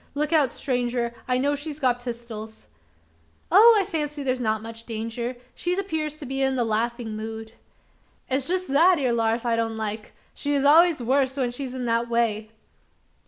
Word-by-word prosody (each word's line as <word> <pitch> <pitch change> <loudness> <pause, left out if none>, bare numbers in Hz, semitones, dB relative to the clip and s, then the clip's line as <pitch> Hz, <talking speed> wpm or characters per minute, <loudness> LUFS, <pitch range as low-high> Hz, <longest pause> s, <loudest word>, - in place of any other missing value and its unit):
Look 300 +2 -1
out 290 -6 +4
stranger! 245 -2 -1
I 250 0 +2
know 285 +3 +1
she's 290 +1 -5
got 245 -3 +1
pistols." 230 -3 -7 0.9
"Oh! 440 +5 +8
I 390 - 0
fancy 300 -5 -3
there's 255 -1 -1
not 220 -2 0
much 230 0 -10
danger. 230 +2 -4 0.2
She 355 +1 -1
appears 315 -6 -2
to 300 - -8
be 270 +1 -3
in 265 0 +1
the 245 - +1
laughing 230 0 -2
mood." 220 0 -6 0.8
"It's 265 0 -1
jest 370 +1 -1
that 335 +6 +5
ere 255 -5 +1
larf 230 +1 0
I 235 -1 +2
don't 225 -1 -2
like: 215 0 -5 0.2
she's 285 -1 -1
allers 320 -1 +5
wust 265 +2 +1
when 250 -3 0
she's 255 0 -5
in 255 -1 -4
that 230 0 0
way." 225 -2 0
250 Hz, 175 wpm, -25 LUFS, 230-290 Hz, 0.9 s, Oh